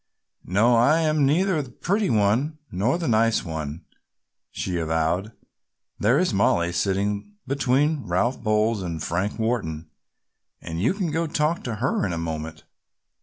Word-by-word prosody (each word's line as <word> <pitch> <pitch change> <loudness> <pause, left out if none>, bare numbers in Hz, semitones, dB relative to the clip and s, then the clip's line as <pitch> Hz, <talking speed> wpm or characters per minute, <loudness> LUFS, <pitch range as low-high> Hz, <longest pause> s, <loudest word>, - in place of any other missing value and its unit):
"No, 110 +6 +4
I 150 +8 +4
am 155 -3 +2
neither 170 +2 +2
the 135 - -9
pretty 195 - -1
one 115 +9 +1
nor 105 - +1
the 170 - -3
nice 115 -1 +2
one," 80 -2 -5 0.6
she 90 - -3
avowed. 80 +5 0 0.7
"There 115 +6 +3
is 180 -6 +1
Mollie 85 -3 +2
sitting 100 - -1
between 140 +1 +1
Ralph 115 +10 0
Bowles 110 -1 +1
and 85 -3 -4
Frank 95 +6 -2
Wharton 85 -10 -2 0.7
and 80 +1 -5
you 125 - +2
can 185 -6 -2
go 165 +2 0
talk 155 +2 0
to 120 -3 -2
her 120 +5 0
in 95 -3 -1
a - - -3
moment. 80 -1 -5
110 Hz, 150 wpm, -24 LUFS, 90-145 Hz, 0.7 s, No